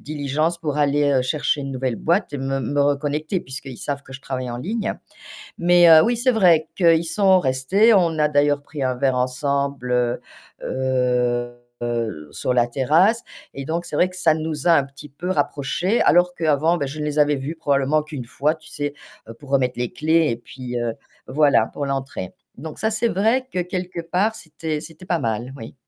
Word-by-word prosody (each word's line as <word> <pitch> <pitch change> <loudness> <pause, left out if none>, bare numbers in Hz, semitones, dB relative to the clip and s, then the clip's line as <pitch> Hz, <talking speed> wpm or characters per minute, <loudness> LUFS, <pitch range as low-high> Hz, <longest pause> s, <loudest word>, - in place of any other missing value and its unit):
diligence 155 +3 -2
pour 150 -3 -3
aller 145 -2 +2
chercher 145 +2 0
une 135 -1 -5
nouvelle 130 -2 -2
boîte 170 - 0
et 145 - -3
me 135 +1 -2
me 140 +3 -1
reconnecter 145 +5 0
puisqu'ils 130 -4 -8
savent 140 -1 -4
que 135 - -14
je 135 - -8
travaille 130 -2 -4
en 120 - -4
ligne. 215 - -2 0.6
Mais 175 -1 +5
oui, 240 - +2
c'est 255 +2 +3
vrai 180 -9 +4
qu'ils 170 -2 +4
sont 190 0 +4
restés. 145 - +3
On 170 -5 +2
a 150 0 +3
d'ailleurs 145 0 +2
pris 145 -1 -7
un 130 -1 0
verre 130 0 +1
ensemble, 130 0 -1
heu, 125 0 +1 0.4
heu, 125 -2 0 0.3
heu, 115 -10 -3
sur - - -1
la 120 -1 +3
terrasse 160 - +2 0.3
et 140 - -6
donc 165 +4 -3
c'est - - -5
vrai 180 - +3
que 185 - -12
ça 165 -4 +3
nous 155 -2 -4
a - - +7
un 145 -4 +4
petit 140 +2 -13
peu 175 +6 -6
rapprochés 185 - 0
alors 175 +3 +4
qu'avant 160 +1 +2
bah 145 - -2
je 145 +3 -6
les 150 0 -2
avais 145 0 +3
vus 140 +4 -5
probablement 145 0 +1
qu'1 145 -6 -7
fois 150 +5 0
tu 155 - -17
sais 145 0 -4 0.5
pour 145 - -14
remettre 130 -3 +1
les 125 -1 -2
clés 160 +1 +2
et 115 - -2
puis, 125 +1 -7
heu, 120 -1 -1 0.3
voilà 145 0 +3
pour 145 - -4
l'entrée. 135 -9 -4 0.2
Donc 155 +2 -8
ça 220 - 0
c'est 220 +2 0
vrai 230 +7 +1
que 180 - -2
quelque 180 -1 -5
part 185 +6 0
c'était 160 -4 -5
c'était 165 +2 -12
pas 175 -2 0
mal, 115 +4 -3
oui. 115 -4 -10
145 Hz, 195 wpm, -22 LUFS, 130-170 Hz, 0.6 s, a